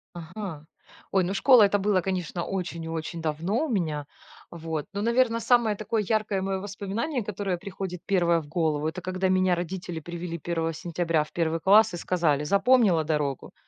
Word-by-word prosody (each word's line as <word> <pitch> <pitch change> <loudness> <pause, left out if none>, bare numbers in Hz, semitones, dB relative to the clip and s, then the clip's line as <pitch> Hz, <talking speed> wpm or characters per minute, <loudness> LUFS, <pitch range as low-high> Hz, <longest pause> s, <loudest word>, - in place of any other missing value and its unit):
Ага. 170 -2 -7 0.5
Ой, 190 -2 +3
ну 185 - -2
школа 245 +2 +6
это 205 0 +3
было, 195 -1 +2
конечно, 180 -2 -3
очень 175 -3 -4
и 160 - -6
очень 165 +1 -4
давно 170 - -1
у - - -5
меня, 160 - -1 0.5
вот. 160 -3 -4
Но, 200 - -2
наверно, 235 +1 +2
самое 230 -2 +3
такое 215 +1 -1
яркое 215 -3 0
мое 195 0 -2
воспоминание, 205 +7 -3
которое 195 -3 -3
приходит 185 -1 -6
1 170 -3 +2
в 145 - -13
голову 155 -2 0
это 170 +3 -4
когда 185 +1 -1
меня 185 -1 +3
родители 175 -1 -5
привели 170 +1 -6
1 165 0 -2
сентября 165 -1 -1
в - - -15
1 165 -1 0
класс 200 +1 +5
и - - -3
сказали: 165 -5 +1
"Запомнила 200 -1 +4
дорогу?" 150 -3 -2
180 Hz, 175 wpm, -26 LUFS, 165-200 Hz, 0.5 s, школа